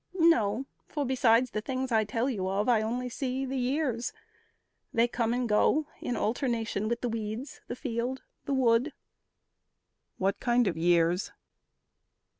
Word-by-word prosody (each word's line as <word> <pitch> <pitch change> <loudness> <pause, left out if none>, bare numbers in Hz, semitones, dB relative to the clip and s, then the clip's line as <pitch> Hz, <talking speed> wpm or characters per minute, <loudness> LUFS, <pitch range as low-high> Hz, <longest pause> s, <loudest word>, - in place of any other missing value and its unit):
"No; 265 - +3 0.2
for 290 -3 -2
besides 250 -1 +3
the 215 - -2
things 260 +1 -3
I 220 -1 +3
tell 225 +4 -1
you 195 -8 -1
of, 200 +2 0
I 235 -3 +4
only 245 +3 -2
see 260 +1 -2
the 265 +1 -4
years. 255 -2 -1 0.8
They 230 +1 +3
come 230 -1 -1
and 245 0 0
go 255 +8 +3
In 245 - -2
alternation 225 -3 -1
with 235 +1 -1
the 245 - -1
weeds, 225 +4 -5
the - - -4
field, 250 0 -3 0.2
The 280 - -1
wood." 250 +3 +3 1.2
"What 195 +1 0
kind 245 -1 +3
of 185 - 0
years?" 170 +2 +2
235 Hz, 150 wpm, -29 LUFS, 220-260 Hz, 1.2 s, I